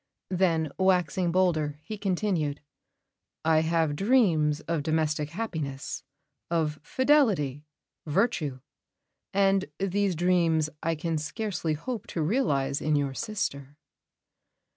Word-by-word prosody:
Then, 165 -5 +1
waxing 180 -2 +2
bolder, 160 -5 +1
he 215 - -5
continued: 185 -7 -1 0.9
"I 160 -1 +5
have 160 -2 +1
dreams 170 - +3
of 165 -2 -2
domestic 155 -1 0
happiness, 155 -8 -4 0.5
of 155 -3 0
fidelity, 190 - +2 0.4
virtue; 150 - 0 0.7
and 195 -1 +3
these 195 -1 0
dreams 165 -3 +2
I 165 0 0
can 160 0 -2
scarcely 165 0 -2
hope 220 - -5
to 165 - -2
realise 145 - +1
in 155 0 +1
your 140 -2 0
sister." 145 - -4
165 Hz, 105 wpm, -28 LUFS, 150-195 Hz, 0.9 s, I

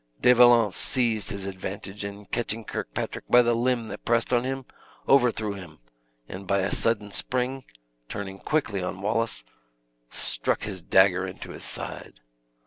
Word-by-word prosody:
De 125 - +6
Valence 120 -4 +6
seized 115 -5 +2
his 100 -1 -3
advantage, 95 +1 -6
and 100 0 -8
catching 115 -1 -2
Kirkpatrick - - -4
by 125 0 +7
the 120 0 +2
limb 120 -1 0
that - - -8
pressed 115 +1 +1
on 120 0 +3
him, 135 0 -3 0.4
overthrew 120 -6 +3
him; 90 -6 -10 0.5
and 95 +1 -8
by 100 0 +2
a 95 - -1
sudden 105 -3 +1
spring, 130 +4 -2 0.4
turning 95 -1 -6
quickly 120 -11 -1
on 90 +1 -4
Wallace, 110 - -1 0.7
struck - - -2
his 95 -4 -5
dagger 95 +1 +4
into 95 - -8
his - - -8
side. - - -7
105 Hz, 150 wpm, -26 LUFS, 95-120 Hz, 0.7 s, by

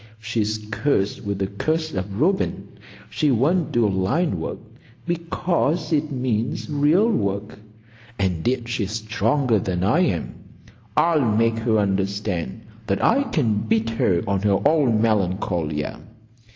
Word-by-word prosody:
She's 110 -1 -1
cursed 105 -4 0
with 100 -1 -2
the 95 - 0
curse 155 +11 -2
of 95 +2 -4
Reuben. 190 +6 0 0.4
She 150 - +1
won't 145 +7 +2
do 120 -2 +3
line 100 - 0
work, - - -4 0.5
because 170 -1 -1
it 150 0 0
means 125 -3 -1
real 150 +9 +3
work; 100 - -2 0.6
and 90 -3 -1
yet 120 -1 0
she's 110 -4 -2
stronger 115 +2 +1
than 90 -2 -2
I 110 - +3
am. 125 - 0 0.6
I'll 165 -3 +4
make 115 -1 +2
her 110 -1 +1
understand 100 -1 -1 0.3
that 100 - 0
I 265 +5 +4
can 120 - +1
beat 110 +1 0
her 95 -6 +1
on 100 -1 0
her 100 -2 +2
own 135 -8 +3
Melancolia. 90 -7 -1
110 Hz, 135 wpm, -22 LUFS, 100-145 Hz, 0.6 s, I'll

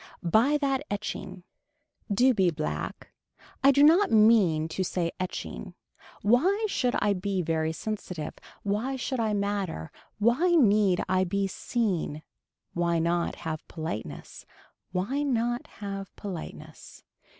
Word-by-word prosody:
Buy 225 - +4
that 275 -2 0
etching. 195 -2 -5 0.7
Do 250 +6 +4
be 190 -5 +3
black. 75 - -4 0.5
I 275 - +8
do 280 +1 +5
not 345 +7 +6
mean 210 -8 +5
to 185 +4 -2
say 170 -2 -1
etching. 185 0 -5 0.5
Why 360 - +3
should 250 -11 0
I 205 -1 +2
be 190 -1 -1
very 160 -1 0
sensitive. 180 -3 -5 0.3
Why 215 +7 -1
should 260 0 -3
I 220 -2 +1
matter. 200 - -2 0.3
Why 255 - +3
need 210 - +4
I 185 0 +2
be 195 +2 0
seen. 190 -7 -2 0.5
Why 170 -1 +1
not 170 +1 0
have 155 -1 -4
politeness. 160 -9 -6 0.4
Why 200 +11 -1
not 240 0 0
have 195 -2 -7
politeness. 190 -6 -8
200 Hz, 125 wpm, -28 LUFS, 175-245 Hz, 0.7 s, I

